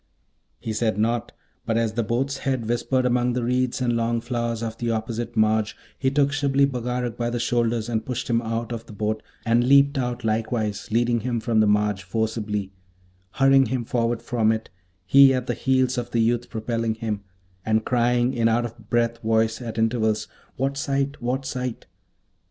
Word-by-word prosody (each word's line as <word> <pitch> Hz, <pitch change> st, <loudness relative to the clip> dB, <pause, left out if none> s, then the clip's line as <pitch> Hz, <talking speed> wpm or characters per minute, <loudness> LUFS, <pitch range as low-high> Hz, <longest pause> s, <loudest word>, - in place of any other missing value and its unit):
He 110 Hz, -, -4 dB
said 110 Hz, -1 st, 0 dB
nought, 115 Hz, +2 st, 0 dB, 0.3 s
but 115 Hz, -, 0 dB
as 115 Hz, -2 st, 0 dB
the 120 Hz, -, 0 dB
boat's 130 Hz, +5 st, -1 dB
head 130 Hz, -5 st, -1 dB
whispered 125 Hz, +2 st, 0 dB
among 125 Hz, 0 st, +2 dB
the 125 Hz, 0 st, -1 dB
reeds 125 Hz, +1 st, 0 dB
and 120 Hz, -2 st, +1 dB
long 115 Hz, 0 st, 0 dB
flowers 115 Hz, -1 st, -2 dB
of 115 Hz, 0 st, -5 dB
the 120 Hz, -, -1 dB
opposite 115 Hz, +1 st, -3 dB
marge, 110 Hz, 0 st, +2 dB, 0.2 s
he 135 Hz, -, 0 dB
took 140 Hz, 0 st, +2 dB
Shibli 140 Hz, -1 st, +2 dB
Bagarag 125 Hz, -2 st, -2 dB
by 120 Hz, -1 st, -1 dB
the 120 Hz, 0 st, -2 dB
shoulders 120 Hz, -2 st, 0 dB
and 110 Hz, -2 st, -1 dB
pushed 125 Hz, +1 st, -4 dB
him 115 Hz, -1 st, +2 dB
out 115 Hz, +1 st, -3 dB
of 115 Hz, -1 st, -6 dB
the -, -, -10 dB
boat, 110 Hz, +1 st, -2 dB, 0.2 s
and 115 Hz, +1 st, +3 dB
leaped 140 Hz, +1 st, +5 dB
out 125 Hz, -1 st, -2 dB
likewise, 110 Hz, -2 st, -1 dB
leading 120 Hz, +1 st, +2 dB
him 120 Hz, +1 st, -2 dB
from 110 Hz, 0 st, +1 dB
the 110 Hz, -, +4 dB
marge 105 Hz, -1 st, +2 dB
forcibly, 105 Hz, 0 st, -2 dB, 0.6 s
hurrying 135 Hz, -1 st, +5 dB
him 125 Hz, 0 st, -2 dB
forward 115 Hz, 0 st, -1 dB
from 110 Hz, -3 st, +2 dB
it, 110 Hz, -4 st, -3 dB, 0.3 s
he 135 Hz, +5 st, +7 dB
at 125 Hz, -1 st, -2 dB
the 120 Hz, -, -1 dB
heels 130 Hz, 0 st, +1 dB
of 120 Hz, 0 st, -5 dB
the 120 Hz, -, 0 dB
youth 120 Hz, +1 st, +1 dB
propelling 115 Hz, 0 st, -2 dB
him; 110 Hz, -3 st, -3 dB, 0.4 s
and 110 Hz, +1 st, +1 dB
crying 120 Hz, +1 st, +2 dB
in 115 Hz, -1 st, +2 dB
out 120 Hz, +1 st, +2 dB
of 115 Hz, -2 st, -10 dB
breath 115 Hz, 0 st, +1 dB
voice 110 Hz, +1 st, +1 dB
at 115 Hz, -2 st, -6 dB
intervals, 110 Hz, -1 st, +1 dB, 0.3 s
'What 135 Hz, +1 st, -1 dB
sight? 140 Hz, 0 st, -1 dB
what 130 Hz, +3 st, -2 dB
sight?' 125 Hz, -2 st, -4 dB
120 Hz, 185 wpm, -24 LUFS, 110-125 Hz, 0.6 s, he